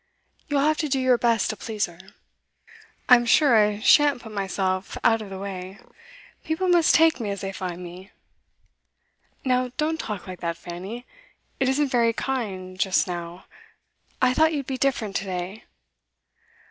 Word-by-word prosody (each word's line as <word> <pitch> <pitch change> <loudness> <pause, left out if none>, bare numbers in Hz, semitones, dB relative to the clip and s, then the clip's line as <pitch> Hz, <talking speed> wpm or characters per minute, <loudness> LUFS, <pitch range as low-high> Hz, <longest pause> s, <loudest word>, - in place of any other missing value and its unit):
You'll 285 -1 +1
have 305 +2 +2
to 305 - -1
do 270 0 +1
your 255 -2 +3
best 230 -3 +2
to - - -6
please 215 -2 -2
her.' 170 -3 -14 1.1
'I'm 240 -2 +6
sure 275 0 +5
I 210 -1 +3
shan't 290 +2 +5
put 220 - -10
myself 190 -1 -2
out 225 -1 +3
of 210 - -8
the 190 - -7
way. 190 0 -7 0.7
People 320 +4 -1
must 345 -2 +4
take 325 -4 +4
me 220 -3 -3
as 200 -1 -4
they 195 - -4
find 180 -2 -6
me.' 180 +3 -10 1.4
'Now 255 -1 +1
don't 320 +1 0
talk 210 -8 -5
like 185 -1 -8
that, 170 -1 -3
Fanny. 190 +9 -8 0.5
It 265 - +2
isn't 280 +1 +1
very 235 -2 +2
kind 195 -8 -4
just 185 0 +2
now. 175 0 -6 0.7
I 255 -1 +3
thought 315 +3 +3
you'd 280 -3 -2
be 265 -1 -4
different 230 -7 0
to 200 - -4
day. 185 +3 -5
220 Hz, 165 wpm, -24 LUFS, 185-265 Hz, 1.4 s, I'm